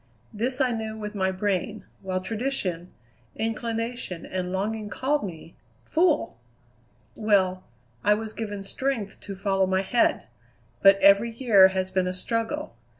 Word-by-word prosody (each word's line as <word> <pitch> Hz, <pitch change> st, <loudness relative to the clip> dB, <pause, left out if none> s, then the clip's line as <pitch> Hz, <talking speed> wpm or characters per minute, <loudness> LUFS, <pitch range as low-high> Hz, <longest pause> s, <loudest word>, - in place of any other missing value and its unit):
This 245 Hz, +5 st, 0 dB
I 260 Hz, -2 st, +2 dB
knew 220 Hz, -1 st, -4 dB
with 210 Hz, -1 st, -6 dB
my 190 Hz, -2 st, 0 dB
brain, 200 Hz, +2 st, -2 dB, 0.2 s
while 185 Hz, -1 st, -2 dB
tradition, 195 Hz, -6 st, -3 dB, 0.4 s
inclination, 225 Hz, -3 st, -3 dB
and 185 Hz, -1 st, -3 dB
longing 210 Hz, +3 st, -2 dB
called 285 Hz, +5 st, 0 dB
me 170 Hz, -3 st, -8 dB, 0.3 s
fool! 320 Hz, -, +1 dB, 0.8 s
Well, 190 Hz, -4 st, +2 dB, 0.4 s
I 210 Hz, 0 st, +5 dB
was 220 Hz, 0 st, -5 dB
given 205 Hz, -3 st, -5 dB
strength 225 Hz, 0 st, -3 dB
to 200 Hz, -, -7 dB
follow 195 Hz, -1 st, +1 dB
my 190 Hz, +1 st, +1 dB
head; 235 Hz, +5 st, +2 dB, 0.6 s
but 195 Hz, 0 st, +7 dB
every 200 Hz, +4 st, +6 dB
year 225 Hz, -5 st, +6 dB
has 190 Hz, 0 st, -2 dB
been 185 Hz, -1 st, +1 dB
a 180 Hz, -, -2 dB
struggle. 225 Hz, -, -2 dB
205 Hz, 140 wpm, -26 LUFS, 190-230 Hz, 0.8 s, but